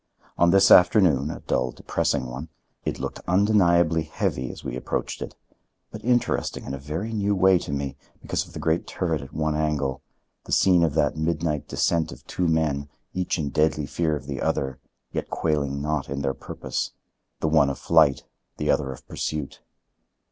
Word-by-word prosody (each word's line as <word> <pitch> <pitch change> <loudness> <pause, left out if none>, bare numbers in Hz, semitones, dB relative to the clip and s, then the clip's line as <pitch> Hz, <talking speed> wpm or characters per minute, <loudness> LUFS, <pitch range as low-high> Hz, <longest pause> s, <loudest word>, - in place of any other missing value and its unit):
On 85 - +4
this 95 +2 +5
afternoon—a 85 - +5
dull, 65 0 0
depressing 65 +2 -1
one—it 70 +6 -7
looked - - -5
undeniably 85 -4 +4
heavy 65 -4 -2
as - - -11
we - - -4
approached 65 - -3
it; - - -6 0.6
but - - -9
interesting 120 +1 0
in - - -5
a 70 - -4
very 80 +11 -4
new 100 -1 +1
way 95 -1 +5
to - - -6
me, 70 -1 -3 0.2
because - - -2
of - - -16
the - - -7
great 80 +1 0
turret 80 -5 -1
at 70 - -10
one 80 0 -1
angle, 75 -4 -1 0.4
the - - -9
scene 90 -3 +5
of 80 -3 +1
that 80 0 +2
midnight 80 -2 -1
descent 80 -1 +1
of - - -12
two 90 - -1
men, 75 -3 0 0.2
each 90 -1 -1
in 75 -4 -2
deadly 75 0 +1
fear 80 +2 0
of 70 -3 -7
the 70 -2 -4
other, 65 -1 -1 0.3
yet - - -3
quailing 70 -3 -1
not 75 -2 -1
in 70 +1 -3
their 70 -1 0
purpose,—the 80 - -6
one 75 -3 +4
of 70 - -3
flight, 80 -4 +4 0.3
the - - +1
other 70 -3 0
of 65 - -11
pursuit. 75 -3 -4
75 Hz, 175 wpm, -25 LUFS, 70-85 Hz, 0.6 s, this